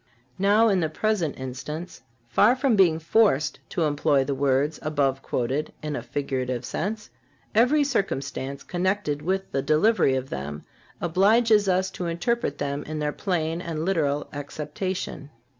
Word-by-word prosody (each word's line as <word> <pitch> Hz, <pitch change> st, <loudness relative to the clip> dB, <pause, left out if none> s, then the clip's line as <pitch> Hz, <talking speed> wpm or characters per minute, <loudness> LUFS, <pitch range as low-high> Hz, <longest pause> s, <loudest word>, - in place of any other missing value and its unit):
Now, 205 Hz, +4 st, +4 dB
in 195 Hz, -4 st, +3 dB
the 160 Hz, -3 st, 0 dB
present 180 Hz, -3 st, -1 dB
instance, 140 Hz, +6 st, -6 dB, 0.3 s
far 210 Hz, -, +4 dB
from 260 Hz, -3 st, +2 dB
being 180 Hz, -5 st, +5 dB
forced 160 Hz, -4 st, +2 dB
to 170 Hz, -, -1 dB
employ 145 Hz, -2 st, +2 dB
the 140 Hz, +1 st, -2 dB
words 140 Hz, +2 st, +1 dB
above 140 Hz, -3 st, 0 dB
quoted 130 Hz, +5 st, -2 dB
in 150 Hz, -1 st, -3 dB
a -, -, -3 dB
figurative 130 Hz, -3 st, -3 dB
sense, 210 Hz, +5 st, -4 dB, 0.4 s
every 255 Hz, +7 st, +4 dB
circumstance 140 Hz, -, -2 dB
connected 180 Hz, -5 st, -1 dB
with 190 Hz, +4 st, -2 dB
the 135 Hz, -, 0 dB
delivery 155 Hz, +1 st, +3 dB
of 130 Hz, 0 st, -4 dB
them 75 Hz, +2 st, -5 dB, 0.4 s
obliges 205 Hz, +4 st, +3 dB
us 190 Hz, +1 st, +1 dB
to 180 Hz, -2 st, -4 dB
interpret 235 Hz, +9 st, -1 dB
them 140 Hz, 0 st, -3 dB
in 155 Hz, 0 st, -5 dB
their 150 Hz, -1 st, -1 dB
plain 170 Hz, -3 st, -1 dB
and 165 Hz, -2 st, -3 dB
literal 150 Hz, -6 st, 0 dB
acceptation. 150 Hz, +2 st, -5 dB
160 Hz, 145 wpm, -25 LUFS, 140-195 Hz, 0.4 s, being